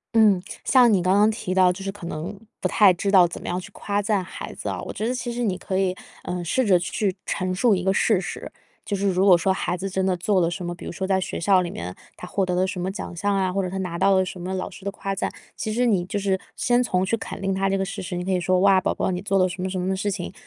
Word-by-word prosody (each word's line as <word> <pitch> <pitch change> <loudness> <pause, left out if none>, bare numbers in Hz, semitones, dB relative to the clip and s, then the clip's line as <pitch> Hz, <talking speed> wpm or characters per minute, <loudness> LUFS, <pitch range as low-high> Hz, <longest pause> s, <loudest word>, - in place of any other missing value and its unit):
嗯， 210 -5 +5 0.2
像 250 -3 +6
你 190 - +3
刚 185 +2 +2
刚 210 +2 +5
提 200 -4 -4
到， 185 -1 +5
就 185 +2 -7
是 - - -2
可 200 -3 -10
能， 170 +6 -5 0.2
不 - - 0
太 205 -4 +6
知 180 +3 -2
道 190 -3 +7
怎 170 - -6
么 - - -8
样 180 - -1
去 180 - -7
夸 205 0 -2
赞 205 -1 +1
孩 185 - -8
子 - - -7
啊， - - -3
我 - - -6
觉 215 - -3
得 250 - -1
其 245 -1 -3
实 240 +1 -3
你 200 -6 0
可 190 0 -3
以， 185 -1 +1 0.3
呃， 180 0 -3
试 250 +10 +1
着 190 -4 +5
去 190 +2 -1
陈 185 -1 -2
述 225 +4 +3
一 185 - 0
个 190 +1 +2
事 205 0 +3
实。 185 - -6 0.3
就 200 - -2
是 200 +1 0
如 190 0 +2
果 185 -3 +7
说 190 +3 +1
孩 180 -1 -2
子 190 +2 -4
真 190 0 -1
的 185 -1 +1
做 185 +2 +2
了 165 - +2
什 180 0 -5
么， 175 - -3
比 - - -11
如 - - -5
说 190 - -4
在 190 -1 +2
学 - - -4
校 185 +2 +4
里 175 - -3
面， 90 +2 -6 0.2
他 180 - -8
获 195 +1 0
得 180 - -1
了 185 +1 +2
什 185 -2 -4
么 185 +2 -2
奖 190 -3 -6
项 200 +4 0
啊， 190 -2 0
或 195 - +1
者 185 - -2
他 190 - -4
拿 180 -3 -3
到 195 +2 +4
了 190 0 +3
什 185 0 -7
么 185 +2 -4
老 185 - -3
师 195 - -13
的 200 - -2
夸 195 0 -4
赞， - - -2 0.2
其 215 - -3
实 245 +3 +1
你 200 -7 +2
就 205 +3 -3
是 195 -1 +1 0.2
先 245 0 +2
从 185 -6 +1
去 215 - +1
肯 225 - -7
定 195 0 -1
他 195 +1 0
这 195 - +1
个 195 - -1
事 190 - -5
实， 180 -1 -4
你 180 - -4
可 190 - -1
以 185 - +2
说： 185 +1 +2
“哇， 195 -1 +5
宝 - - 0
宝 - - -1
你 180 0 -3
做 195 0 0
了 185 - +4
什 180 0 -6
么 185 - -2
什 185 0 -3
么 190 +1 -1
事 195 +2 -1
情，” 180 -2 -5
190 Hz, 340 characters per minute, -24 LUFS, 180-200 Hz, 0.3 s, 道